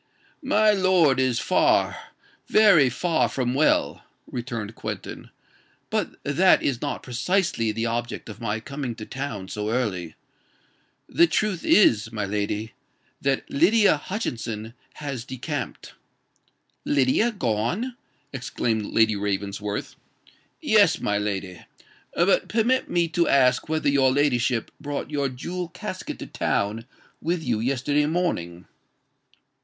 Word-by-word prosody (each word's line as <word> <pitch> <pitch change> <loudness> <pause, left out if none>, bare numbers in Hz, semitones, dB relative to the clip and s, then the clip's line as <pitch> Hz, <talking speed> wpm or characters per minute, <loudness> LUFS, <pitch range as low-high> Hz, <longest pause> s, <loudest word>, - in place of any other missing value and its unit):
"My 215 -6 +3
lord 185 -9 +3
is 130 -3 +1
far—very 160 - +2
far 160 +6 0
from 125 -2 -1
well," 145 +4 +2 0.2
returned 115 -3 -5
Quentin: - - -7 0.6
"but - - -1
that 175 +7 +4
is 125 -4 -1
not 145 -3 -3
precisely 130 - 0
the 115 +2 -2
object 120 +1 -3
of 110 - -10
my 110 -1 -2
coming 135 0 -5
to 110 -2 -8
town 130 -9 -5
so 105 +2 -4
early. 100 -9 -2 0.9
The 170 - +4
truth 185 +2 -1
is, 115 - +4
my 105 -3 -2
lady, 105 +2 -3 0.5
that 135 -1 0
Lydia 200 +6 +4
Hutchinson 115 - -4 0.2
has 140 -5 -5
decamped." 135 +1 -6 0.9
"Lydia 145 - +2
gone!" 180 - -1 0.4
exclaimed 120 -4 -2
Lady 110 -1 +3
Ravensworth. 100 +1 -3 0.7
"Yes—my 105 0 +3
lady. 95 -4 -4 0.5
But 175 +3 +3
permit 235 +4 +1
me 170 -1 +2
to 170 +1 +1
ask 130 +1 +3
whether 155 -1 0
your 135 -2 +4
ladyship 130 -4 +1
brought 145 0 -4
your 140 -2 0
jewel 175 +8 -5
casket 185 +2 -6
to - - -7
town 110 +4 -2 0.3
with 170 0 -1
you 120 -6 0
yesterday 140 +4 +1
morning." 90 - -2
130 Hz, 115 wpm, -24 LUFS, 110-165 Hz, 0.9 s, that